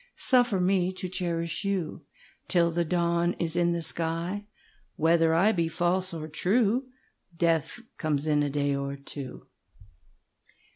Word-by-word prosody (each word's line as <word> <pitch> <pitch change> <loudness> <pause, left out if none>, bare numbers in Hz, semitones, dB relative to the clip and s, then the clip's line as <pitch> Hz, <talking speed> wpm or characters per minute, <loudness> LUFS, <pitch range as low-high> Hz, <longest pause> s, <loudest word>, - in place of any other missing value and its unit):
Suffer 245 -6 +3
me 185 0 +2
to 185 0 -5
cherish 170 -1 -2
youTill 175 -2 -2
the 170 +1 +1
dawn 170 +1 +1
is 165 -1 -3
in 175 0 +3
the 170 -1 -1
sky. 170 +5 -3 0.5
Whether 165 0 +3
I 195 +6 +5
be 170 -6 0
false 180 +3 0
or 160 -2 -5
true, 215 - +1 0.5
Death 165 +4 +1 0.2
comes 150 -3 0
in 150 -1 +2
a 145 - +1
day 145 0 0
or 140 0 -3
two. 140 -1 -9
170 Hz, 135 wpm, -28 LUFS, 160-185 Hz, 0.5 s, I